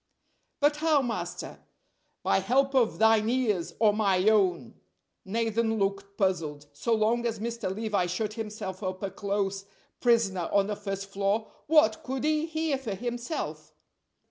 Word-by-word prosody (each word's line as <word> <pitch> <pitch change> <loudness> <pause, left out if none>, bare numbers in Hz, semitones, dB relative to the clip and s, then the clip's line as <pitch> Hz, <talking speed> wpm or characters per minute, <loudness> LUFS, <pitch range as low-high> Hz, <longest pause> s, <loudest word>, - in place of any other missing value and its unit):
"But 295 +1 +3
how, 305 -3 +3
master?" 180 -7 -4 0.6
"By - - +3
help 270 +7 +2
of 250 -4 +2
thine 220 0 +4
ears, 220 -9 0
or 215 -2 +4
my 200 -2 +2
own!" 185 - +2 0.5
Nathan 225 +2 0
looked 195 0 -2
puzzled. 165 -7 -1
So 225 +11 0
long 225 +2 +1
as 225 -1 -2
Mr. 230 -2 -3
Levi 205 -3 0
shut 205 +4 -2
himself 210 -4 -5
up 185 0 -4
a 195 - -2
close 195 0 -2 0.4
prisoner 220 -8 +2
on 200 -1 +3
the 210 +1 -2
first 195 -1 -4
floor 200 +2 0 0.2
what 300 -9 +4
could 265 0 -3
he 310 +1 +1
hear 315 -3 -1
for 225 -7 -4
himself? 240 - -5
215 Hz, 145 wpm, -28 LUFS, 195-235 Hz, 0.6 s, thine